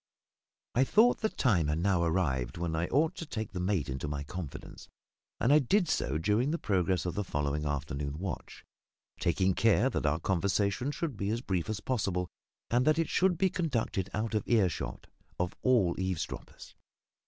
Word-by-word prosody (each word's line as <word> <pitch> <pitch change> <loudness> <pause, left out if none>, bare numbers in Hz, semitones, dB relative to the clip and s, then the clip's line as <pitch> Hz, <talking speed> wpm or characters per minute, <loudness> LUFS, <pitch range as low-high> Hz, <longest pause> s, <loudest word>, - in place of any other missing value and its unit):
I 130 - +4
thought 220 - +4
the 220 - +1
time 95 - +2
had 75 +1 0
now 90 +1 +2
arrived 80 -8 0
when 85 -1 -2
I 85 +2 0
ought 155 +4 +2
to 165 - -5
take 110 -6 -4
the 90 - -4
mate 90 -4 0
into 65 +1 -4
my 70 -1 -3
confidence, 80 0 -8 0.5
and 125 +5 +4
I 150 - +7
did 175 - +2
so 70 - 0
during 105 - +1
the 165 - 0
progress 95 - 0
of 90 - -1
the 105 - -1
following 75 -3 -2
afternoon 70 0 -3
watch; 90 -2 -6 0.5
taking 95 +3 +2
care 115 +5 +3
that 75 - -1
our 75 +2 +1
conversation 100 +7 0
should 150 - -3
be 100 0 -2
as 115 +2 -1
brief 95 -5 -2
as 110 -2 -3
possible, 95 -8 -1 0.4
and 120 +2 +3
that 155 +1 +4
it 165 -1 0
should 180 -2 +2
be 190 +1 +2
conducted 125 - -1
out 110 +1 -2
of 110 - +2
earshot 100 -8 0 0.3
of 90 0 -1
all 115 -9 +3
eavesdroppers. 95 -3 -4
95 Hz, 180 wpm, -30 LUFS, 85-125 Hz, 0.5 s, I